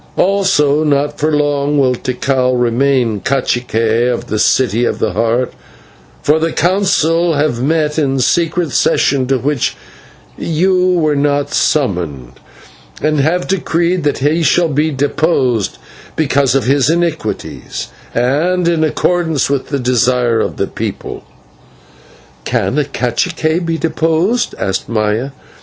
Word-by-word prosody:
Also, 180 Hz, -7 st, +2 dB
not 145 Hz, 0 st, 0 dB
for 155 Hz, +1 st, +1 dB
long 145 Hz, -1 st, 0 dB
will 130 Hz, -2 st, +3 dB
Tikal 130 Hz, 0 st, -1 dB
remain 120 Hz, -2 st, +1 dB
/cacique/ 120 Hz, -3 st, 0 dB
of 120 Hz, -, -4 dB
the 110 Hz, -, -1 dB
City 120 Hz, 0 st, +2 dB
of -, -, 0 dB
the -, -, -1 dB
Heart; 115 Hz, +3 st, 0 dB, 0.7 s
for 150 Hz, +2 st, +3 dB
the 165 Hz, +1 st, 0 dB
Council 170 Hz, -2 st, +1 dB
have 145 Hz, -5 st, 0 dB
met 150 Hz, +2 st, 0 dB
in 135 Hz, -3 st, 0 dB
a -, -, -1 dB
secret 165 Hz, +3 st, +1 dB
session 130 Hz, 0 st, +1 dB
to 135 Hz, 0 st, +1 dB
which 140 Hz, +1 st, -1 dB, 0.6 s
you 180 Hz, +3 st, +1 dB
were 155 Hz, -4 st, +1 dB
not 145 Hz, 0 st, 0 dB
summoned, 85 Hz, -, -1 dB, 0.7 s
and 155 Hz, -1 st, 0 dB
have 165 Hz, +6 st, +1 dB
decreed 175 Hz, -1 st, 0 dB
that 145 Hz, -, 0 dB
he 150 Hz, +5 st, +1 dB
shall 165 Hz, +3 st, +2 dB
be 150 Hz, +2 st, +1 dB
deposed 135 Hz, -, 0 dB, 0.4 s
because 140 Hz, -3 st, +1 dB
of 135 Hz, -, +2 dB
his 135 Hz, +1 st, +2 dB
iniquities, 165 Hz, -8 st, -3 dB, 0.3 s
and 160 Hz, +9 st, +1 dB
in 165 Hz, -2 st, +2 dB
accordance 160 Hz, -2 st, 0 dB
with 140 Hz, -2 st, -2 dB
the 140 Hz, -, -1 dB
desire 125 Hz, -2 st, +1 dB
of -, -, -2 dB
the -, -, 0 dB
people." -, -, -6 dB, 1.2 s
"Can 150 Hz, -, 0 dB
a 150 Hz, -, 0 dB
/cacique/ 160 Hz, +7 st, -1 dB
be 165 Hz, 0 st, -1 dB
deposed?" 165 Hz, +8 st, 0 dB
asked 95 Hz, 0 st, -3 dB
Maya. 110 Hz, +3 st, 0 dB
145 Hz, 135 wpm, -15 LUFS, 125-160 Hz, 1.2 s, will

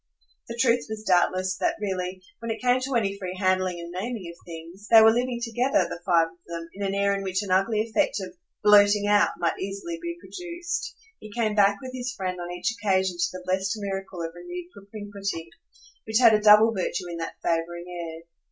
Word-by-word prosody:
The 230 Hz, -, -6 dB
truth 235 Hz, -1 st, +3 dB
was 215 Hz, 0 st, -5 dB
doubtless 185 Hz, 0 st, +2 dB
that -, -, 0 dB
really, 185 Hz, -2 st, -3 dB, 0.2 s
when 230 Hz, 0 st, -6 dB
it 225 Hz, -, -2 dB
came 250 Hz, 0 st, +3 dB
to 265 Hz, 0 st, -2 dB
any 200 Hz, -3 st, 0 dB
free 185 Hz, -1 st, -5 dB
handling 185 Hz, -2 st, +1 dB
and 170 Hz, 0 st, -7 dB
naming 190 Hz, -1 st, -5 dB
of -, -, -23 dB
things, 170 Hz, +5 st, -10 dB
they 225 Hz, -, +9 dB
were 220 Hz, 0 st, +8 dB
living 245 Hz, 0 st, -1 dB
together, 240 Hz, +3 st, +1 dB
the 170 Hz, -, -7 dB
five 170 Hz, -3 st, +3 dB
of 165 Hz, -, -24 dB
them, 170 Hz, 0 st, -6 dB
in 200 Hz, -, -6 dB
an 195 Hz, 0 st, -1 dB
air 200 Hz, 0 st, +2 dB
in 200 Hz, -, -2 dB
which 190 Hz, +1 st, -1 dB
an 195 Hz, -, -5 dB
ugly 210 Hz, +4 st, +3 dB
effect 230 Hz, +3 st, 0 dB
of 185 Hz, -2 st, -7 dB, 0.3 s
"blurting 205 Hz, 0 st, +6 dB
out" 205 Hz, 0 st, +4 dB
might 170 Hz, -1 st, -1 dB
easily 200 Hz, -, -5 dB
be 340 Hz, 0 st, -5 dB
produced. 345 Hz, -1 st, -5 dB, 0.2 s
He 215 Hz, -, -11 dB
came 220 Hz, -1 st, 0 dB
back 200 Hz, -1 st, +4 dB
with 255 Hz, 0 st, -7 dB
his 255 Hz, -1 st, -3 dB
friend 185 Hz, -3 st, -3 dB
on 175 Hz, -, -5 dB
each 180 Hz, +4 st, -1 dB
occasion 190 Hz, -3 st, +1 dB
to 175 Hz, 0 st, +2 dB
the 185 Hz, 0 st, -8 dB
blest 190 Hz, +2 st, 0 dB
miracle 195 Hz, -3 st, -4 dB
of 165 Hz, 0 st, -5 dB
renewed 175 Hz, 0 st, -8 dB
propinquity, 200 Hz, -4 st, -6 dB, 0.6 s
which 220 Hz, 0 st, +2 dB
had 230 Hz, -2 st, +7 dB
a 210 Hz, -, +3 dB
double 215 Hz, +2 st, +7 dB
virtue 180 Hz, -2 st, -2 dB
in 170 Hz, -1 st, -5 dB
that 165 Hz, 0 st, -5 dB
favouring 170 Hz, +1 st, -1 dB
air. 165 Hz, -2 st, -7 dB
195 Hz, 210 wpm, -26 LUFS, 180-220 Hz, 0.6 s, they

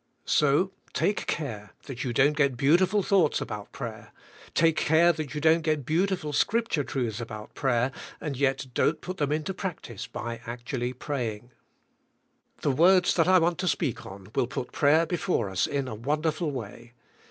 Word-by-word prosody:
So 150 Hz, +6 st, +3 dB, 0.2 s
take 205 Hz, -, 0 dB
care 110 Hz, -10 st, -4 dB
that 130 Hz, -2 st, -6 dB
you 125 Hz, -, -2 dB
don't 140 Hz, +5 st, +3 dB
get 140 Hz, -4 st, +2 dB
beau 140 Hz, +4 st, +5 dB
tiful 190 Hz, +3 st, +2 dB
thoughts 180 Hz, -7 st, +3 dB
about 105 Hz, -2 st, -6 dB
prayer; -, -, -7 dB, 0.4 s
take 165 Hz, -1 st, +4 dB
care 165 Hz, +3 st, +4 dB
that 155 Hz, -2 st, -5 dB
you -, -, -1 dB
don't 160 Hz, +2 st, +4 dB
get 155 Hz, -4 st, -1 dB
beautiful 170 Hz, -1 st, 0 dB
Scripture 225 Hz, -2 st, +1 dB
truths 120 Hz, -5 st, -3 dB
about 105 Hz, -2 st, -8 dB
prayer 130 Hz, -1 st, +1 dB, 0.3 s
and 150 Hz, -3 st, -4 dB
yet 135 Hz, 0 st, 0 dB
don't 160 Hz, -, +1 dB
put 185 Hz, +1 st, -6 dB
them 145 Hz, -1 st, 0 dB
into 155 Hz, +4 st, -1 dB
practice 165 Hz, -, -6 dB
by 115 Hz, 0 st, -6 dB
actually 120 Hz, +1 st, -3 dB
praying. 120 Hz, -4 st, -4 dB, 1.1 s
The 145 Hz, -, +3 dB
words 180 Hz, +6 st, +5 dB
that 165 Hz, -1 st, +2 dB
I 185 Hz, 0 st, +6 dB
want 170 Hz, 0 st, +1 dB
to 185 Hz, -, -1 dB
speak 150 Hz, -9 st, -1 dB
on 95 Hz, 0 st, -11 dB
will 120 Hz, -, +1 dB
put 125 Hz, -, -5 dB
prayer 155 Hz, +3 st, +4 dB
before 160 Hz, -, -1 dB
us 95 Hz, -, +1 dB
in 140 Hz, -2 st, -2 dB
a 125 Hz, -, -5 dB
wonderful 150 Hz, +7 st, -1 dB
way. 120 Hz, -2 st, -7 dB
145 Hz, 175 wpm, -27 LUFS, 120-165 Hz, 1.1 s, I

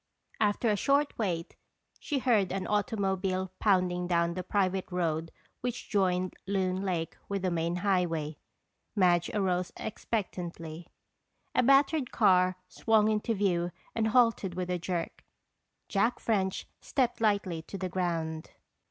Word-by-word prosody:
After 215 Hz, +2 st, +2 dB
a -, -, +2 dB
short 280 Hz, +7 st, +2 dB
wait 175 Hz, -6 st, -2 dB, 0.4 s
she 290 Hz, -, -2 dB
heard 225 Hz, -8 st, +2 dB
an 190 Hz, 0 st, -2 dB
automobile 190 Hz, -3 st, 0 dB
pounding 180 Hz, -3 st, +2 dB
down 170 Hz, -1 st, +2 dB
the 185 Hz, -, -3 dB
private 190 Hz, 0 st, 0 dB
road 165 Hz, -2 st, -1 dB, 0.3 s
which 245 Hz, -1 st, -4 dB
joined 185 Hz, -3 st, +1 dB
Loon 190 Hz, -1 st, 0 dB
Lake 175 Hz, -4 st, -2 dB
with 200 Hz, -1 st, -2 dB
the 185 Hz, -, +1 dB
main 170 Hz, 0 st, 0 dB
highway. 175 Hz, -5 st, 0 dB, 0.6 s
Madge 175 Hz, -4 st, +3 dB
arose 185 Hz, -3 st, 0 dB
expectantly. 175 Hz, -7 st, -4 dB, 0.7 s
A -, -, +4 dB
battered 275 Hz, +1 st, +4 dB
car 185 Hz, -4 st, +4 dB
swung 220 Hz, +2 st, +2 dB
into 215 Hz, +1 st, 0 dB
view 180 Hz, -3 st, +1 dB, 0.2 s
and 220 Hz, -1 st, +1 dB
halted 225 Hz, -6 st, +3 dB
with 180 Hz, 0 st, -2 dB
a 180 Hz, -, 0 dB
jerk. 175 Hz, -1 st, -3 dB, 0.6 s
Jack 225 Hz, +5 st, +1 dB
French 190 Hz, -4 st, 0 dB
stepped 245 Hz, -3 st, 0 dB
lightly 200 Hz, -6 st, +1 dB
to 195 Hz, -, -8 dB
the 185 Hz, -, -2 dB
ground. 165 Hz, -3 st, -2 dB
185 Hz, 135 wpm, -30 LUFS, 175-210 Hz, 0.7 s, A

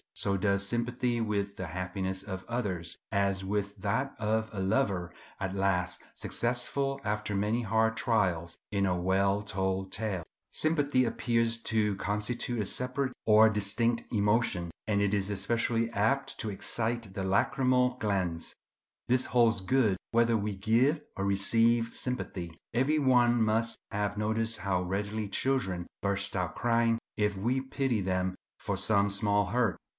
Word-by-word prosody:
So 100 Hz, -, +1 dB
does 100 Hz, 0 st, +1 dB
sympathy 120 Hz, +1 st, -1 dB
with 100 Hz, -2 st, -2 dB
the 95 Hz, -, -4 dB
happiness 95 Hz, +2 st, -3 dB
of 95 Hz, -2 st, -6 dB
others, 95 Hz, -8 st, -3 dB
as 100 Hz, -2 st, +1 dB
with 100 Hz, +1 st, -2 dB
that 110 Hz, +8 st, -1 dB
of 110 Hz, +1 st, 0 dB
a 100 Hz, -, -5 dB
lover, 95 Hz, -3 st, 0 dB, 0.3 s
at 95 Hz, 0 st, -3 dB
last 90 Hz, -2 st, +1 dB
successful 135 Hz, +3 st, -1 dB
after 105 Hz, -1 st, -2 dB
many 105 Hz, +4 st, +1 dB
hard 110 Hz, 0 st, +1 dB
trials 85 Hz, -7 st, 0 dB
in 100 Hz, -1 st, +1 dB
a 90 Hz, -2 st, +1 dB
well 95 Hz, +2 st, +2 dB
told 95 Hz, -1 st, -2 dB
tale. 100 Hz, -4 st, -2 dB, 0.3 s
Sympathy 145 Hz, -5 st, +2 dB
appears 115 Hz, 0 st, +1 dB
to 105 Hz, -3 st, +1 dB
constitute 105 Hz, +4 st, -1 dB
a -, -, -1 dB
separate 125 Hz, +5 st, -2 dB
or 110 Hz, 0 st, +7 dB
distinct 110 Hz, +3 st, +1 dB
emotion; 105 Hz, -5 st, +1 dB, 0.2 s
and 100 Hz, -2 st, +2 dB
it 100 Hz, 0 st, +1 dB
is 100 Hz, -1 st, 0 dB
especially 115 Hz, +3 st, 0 dB
apt 115 Hz, +6 st, 0 dB
to 110 Hz, -, -2 dB
excite 115 Hz, +1 st, -2 dB
the 95 Hz, -, -3 dB
lacrymal 125 Hz, +5 st, +2 dB
glands. 95 Hz, -6 st, -1 dB, 0.5 s
This 125 Hz, +1 st, +3 dB
holds 115 Hz, -5 st, +3 dB
good 105 Hz, -1 st, +2 dB
whether 115 Hz, 0 st, +3 dB
we 105 Hz, -1 st, -2 dB
give 120 Hz, +10 st, +2 dB
or 100 Hz, -, -2 dB
receive 115 Hz, +4 st, +3 dB
sympathy. 95 Hz, -8 st, -4 dB, 0.2 s
Every 135 Hz, +6 st, +2 dB
one 120 Hz, -3 st, +4 dB
must 110 Hz, +1 st, +1 dB
have 105 Hz, 0 st, -1 dB
noticed 110 Hz, +1 st, -1 dB
how 90 Hz, -1 st, 0 dB
readily 100 Hz, +3 st, -2 dB
children 95 Hz, -8 st, -1 dB
burst 100 Hz, 0 st, -1 dB
out 90 Hz, -3 st, -2 dB
crying 115 Hz, -1 st, +2 dB, 0.2 s
if 105 Hz, -1 st, +1 dB
we 120 Hz, +7 st, 0 dB
pity 135 Hz, -4 st, -1 dB
them 95 Hz, 0 st, -1 dB, 0.2 s
for -, -, -2 dB
some 100 Hz, -2 st, +3 dB
small 100 Hz, 0 st, +2 dB
hurt. 115 Hz, 0 st, +1 dB
105 Hz, 145 wpm, -30 LUFS, 95-120 Hz, 0.5 s, or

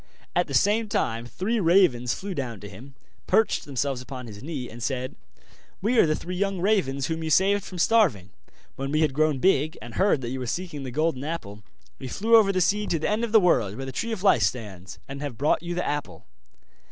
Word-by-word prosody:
At -, -, +2 dB
the -, -, -3 dB
same 215 Hz, +2 st, +2 dB
time 115 Hz, -, -1 dB
three 205 Hz, -, -2 dB
ravens 165 Hz, -, +3 dB
flew 195 Hz, 0 st, -5 dB
down 125 Hz, -, -4 dB
to 105 Hz, -, -8 dB
him, 125 Hz, +8 st, -12 dB, 0.3 s
perched 220 Hz, +3 st, +2 dB
themselves 135 Hz, -1 st, -2 dB
upon 125 Hz, 0 st, -8 dB
his 105 Hz, -3 st, -10 dB
knee, 140 Hz, -3 st, -5 dB
and 120 Hz, +1 st, -11 dB
said: 130 Hz, +1 st, -3 dB, 0.6 s
'We 225 Hz, +4 st, +2 dB
are -, -, +7 dB
the 155 Hz, -, +1 dB
three 180 Hz, +3 st, -6 dB
young 195 Hz, 0 st, -1 dB
ravens 170 Hz, -9 st, +1 dB
whom 160 Hz, +3 st, -3 dB
you 160 Hz, -, -2 dB
saved 195 Hz, +5 st, +3 dB
from 185 Hz, -, -9 dB
starving; 165 Hz, -, +2 dB, 0.4 s
when 135 Hz, +1 st, -4 dB
we 155 Hz, +1 st, +2 dB
had 155 Hz, -3 st, +2 dB
grown 155 Hz, 0 st, +2 dB
big, 155 Hz, 0 st, +2 dB
and 115 Hz, +1 st, -10 dB
heard 190 Hz, -, +2 dB
that 120 Hz, -, -4 dB
you 130 Hz, +1 st, -4 dB
were 125 Hz, -, -4 dB
seeking 170 Hz, +1 st, -4 dB
the 135 Hz, -, -5 dB
Golden 150 Hz, 0 st, -1 dB
Apple, 110 Hz, -10 st, -5 dB, 0.4 s
we -, -, -6 dB
flew 225 Hz, -, +2 dB
over 215 Hz, -3 st, +6 dB
the 185 Hz, -1 st, 0 dB
sea 210 Hz, +4 st, +1 dB
to 165 Hz, -, +1 dB
the 155 Hz, -, -2 dB
end 215 Hz, +2 st, 0 dB
of 235 Hz, -, -2 dB
the 220 Hz, -, +7 dB
world, 120 Hz, -, +2 dB
where 135 Hz, -, -5 dB
the 130 Hz, -, -5 dB
Tree 230 Hz, -, -3 dB
of 210 Hz, -4 st, -4 dB
Life 195 Hz, -, +5 dB
stands, 95 Hz, -6 st, -3 dB
and 140 Hz, +1 st, -7 dB
have 140 Hz, -6 st, -5 dB
brought 145 Hz, +5 st, +2 dB
you 175 Hz, 0 st, -4 dB
the 180 Hz, -, -1 dB
apple. 145 Hz, 0 st, -4 dB
150 Hz, 230 wpm, -25 LUFS, 125-190 Hz, 0.6 s, are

